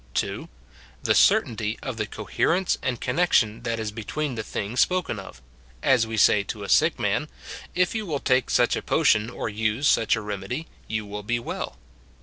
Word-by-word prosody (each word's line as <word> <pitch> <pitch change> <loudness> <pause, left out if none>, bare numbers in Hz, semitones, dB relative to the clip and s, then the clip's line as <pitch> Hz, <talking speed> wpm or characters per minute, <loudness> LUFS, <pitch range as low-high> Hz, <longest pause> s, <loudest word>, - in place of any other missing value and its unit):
(2.) - - -2 0.5
The - - +3
certainty 110 -1 +3
of 130 -5 -4
the 105 -2 -2
eolierence 165 - 0
and 125 -2 -2
connection 125 -6 +2
that 115 -1 -2
is 110 -2 -3
between 130 +7 -3
the 110 - -3
things 110 +2 -4
spoken 180 - +1
of; 65 -10 -11 0.4
as 120 -4 +4
we 110 0 -4
say 105 0 +5
to 105 +1 -6
a 100 - -6
sick - - +4
man, - - 0 0.3
" - - -10
If 180 0 +2
you 220 -3 -3
wdll 145 -4 -3
take 130 -1 +2
such 120 -1 +3
a - - -3
potion, 115 -8 +2
or - - -4
use 110 +5 0
such 115 - +4
a 110 - -4
remedy, 105 +8 -4 0.2
you 110 -1 -3
will 105 0 -6
be 120 +4 -1
well." 120 - -5
115 Hz, 190 wpm, -25 LUFS, 105-130 Hz, 0.5 s, say